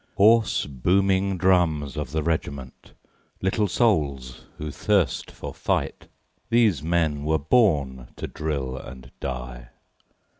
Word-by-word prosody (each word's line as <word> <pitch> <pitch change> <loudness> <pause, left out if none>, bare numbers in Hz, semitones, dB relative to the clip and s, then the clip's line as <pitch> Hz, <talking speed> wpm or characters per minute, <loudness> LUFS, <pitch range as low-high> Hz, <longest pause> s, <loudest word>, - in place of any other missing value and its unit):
Hoarse, 110 +2 +4
booming 95 +7 +1
drums 85 -6 +2
of 75 -1 -4
the 80 0 -1
regiment, 70 -5 -4 0.5
Little 100 +3 +1
souls 70 - 0
who 75 -1 -5
thirst 95 - 0
for - - -8
fight, - - -2 0.4
These 115 - +3
men 80 -3 0
were 80 +1 +2
born 70 - +2
to - - -5
drill 70 -5 -3
and 65 -1 -10
die. 60 -2 -6
80 Hz, 115 wpm, -24 LUFS, 65-95 Hz, 0.5 s, Hoarse